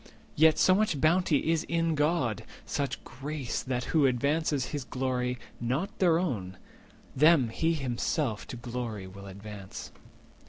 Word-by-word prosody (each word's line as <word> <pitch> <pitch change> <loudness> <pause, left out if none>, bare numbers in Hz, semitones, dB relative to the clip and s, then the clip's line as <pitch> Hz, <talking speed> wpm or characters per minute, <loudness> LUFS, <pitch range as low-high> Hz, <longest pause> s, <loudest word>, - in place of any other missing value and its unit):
Yet 160 +1 +5
so 185 - +5
much 195 -7 +1
bounty 160 0 +3
is 165 -1 +1
in 165 -1 +1
God, 145 - +1 0.2
such 140 -3 -2
grace, 140 -2 -4
That 125 -1 -2
who 150 -4 +5
advances 140 +2 0
his 145 -3 -2
glory, 125 0 -1 0.2
not 135 - -2
their 170 -4 +4
own, 105 - -2 0.6
Them 150 -3 +5
he 165 +8 +1
himself 130 -3 -1
to - - -6
glory 120 -4 -5
will 100 +1 -10
advance." 100 0 -8
135 Hz, 135 wpm, -29 LUFS, 120-160 Hz, 0.6 s, Yet